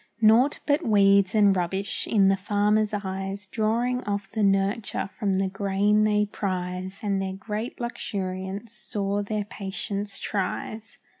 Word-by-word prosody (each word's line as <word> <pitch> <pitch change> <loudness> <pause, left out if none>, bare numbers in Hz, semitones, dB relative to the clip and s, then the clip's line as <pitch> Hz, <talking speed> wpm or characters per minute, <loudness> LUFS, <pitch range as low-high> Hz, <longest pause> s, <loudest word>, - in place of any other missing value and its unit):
Naught 230 +6 +5
but 295 +3 +2
weeds 200 -3 +4
and 205 -2 +5
rubbish, 190 +3 -2
in 200 -3 +4
the 195 - +4
farmer's 210 +2 +1
eyes, 195 -1 -4
Drawing 235 +5 0
off 200 -1 -2
the 220 - -2
nurture 195 +2 +1
from 205 -3 -1
the 190 0 +1
grain 200 +2 +2
they 210 0 +3
prize, 185 -1 -4
And 200 -2 0
their 190 0 -3
great 210 +4 -5
luxuriance 195 -3 -4
sore 205 -2 -2
their 210 0 -2
patience 200 0 -4
tries. 215 +3 -4
200 Hz, 140 wpm, -26 LUFS, 195-215 Hz, -, Naught